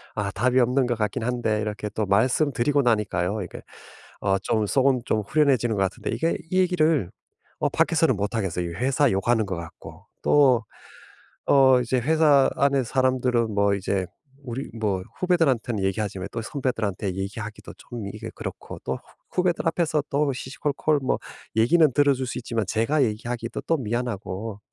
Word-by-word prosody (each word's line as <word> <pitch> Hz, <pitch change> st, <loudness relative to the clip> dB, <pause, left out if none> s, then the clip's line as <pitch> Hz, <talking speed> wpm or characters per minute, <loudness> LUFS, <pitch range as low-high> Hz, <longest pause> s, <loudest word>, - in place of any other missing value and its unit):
아 105 Hz, -2 st, -1 dB
답이 125 Hz, +6 st, +2 dB
없는 125 Hz, +1 st, +2 dB
것 120 Hz, -, -1 dB
같긴 105 Hz, 0 st, -2 dB
한데 115 Hz, -3 st, 0 dB
이렇게 105 Hz, 0 st, -3 dB
또 110 Hz, 0 st, -2 dB
말씀드리고 130 Hz, +6 st, +2 dB
나니까요, 105 Hz, -4 st, 0 dB
이게 90 Hz, -, -9 dB, 0.6 s
어 95 Hz, -1 st, +2 dB
좀 110 Hz, -2 st, 0 dB
속은 130 Hz, +2 st, +2 dB
좀 110 Hz, -, +1 dB
후련해지는 120 Hz, -1 st, +2 dB
것 95 Hz, -, +2 dB
같은데 95 Hz, -, -3 dB
이게 160 Hz, +9 st, 0 dB, 0.2 s
이 185 Hz, -, +2 dB
얘기를 160 Hz, -, +2 dB, 0.5 s
어 -, -, +1 dB
밖에서는 -, -, +2 dB
못 100 Hz, +2 st, -2 dB
하겠어요. 90 Hz, -5 st, -2 dB
이 -, -, -7 dB
회사 135 Hz, -, +2 dB
욕하는 110 Hz, +3 st, +1 dB
것 95 Hz, -2 st, -3 dB
같고. 85 Hz, -1 st, -10 dB, 0.2 s
또 130 Hz, -5 st, +4 dB, 0.8 s
어 130 Hz, -2 st, +6 dB
이제 125 Hz, +1 st, 0 dB
회사 150 Hz, -1 st, +4 dB
안에 140 Hz, -1 st, +2 dB
사람들은 125 Hz, -2 st, +1 dB
뭐 100 Hz, 0 st, +2 dB
이제 95 Hz, -1 st, -2 dB, 0.4 s
우리 130 Hz, +1 st, -5 dB
뭐 105 Hz, -5 st, -1 dB, 0.2 s
후배들한테는 135 Hz, -, +1 dB
얘기하지만 95 Hz, -1 st, -2 dB
또 115 Hz, -, -4 dB
선배들한테 110 Hz, -7 st, -2 dB
얘기하기도 105 Hz, +2 st, -6 dB
좀 115 Hz, -5 st, -7 dB
이게 -, -, -7 dB
그렇고 -, -, -7 dB
또 -, -, -1 dB
후 -, -, -10 dB, 0.4 s
후배들 175 Hz, -2 st, 0 dB
앞에서 165 Hz, -2 st, +1 dB
또 140 Hz, 0 st, +1 dB
시시콜콜 145 Hz, +3 st, -1 dB
뭐 -, -, 0 dB, 0.4 s
얘기는 155 Hz, +9 st, +5 dB
들어줄 140 Hz, -2 st, +3 dB
수 120 Hz, -, -4 dB
있지만 115 Hz, -3 st, -2 dB
제가 115 Hz, +9 st, +1 dB
얘기하기도 115 Hz, +1 st, -3 dB
또 165 Hz, -, +2 dB
미안하고. 110 Hz, -4 st, -4 dB
120 Hz, 355 characters per minute, -24 LUFS, 105-135 Hz, 0.8 s, 어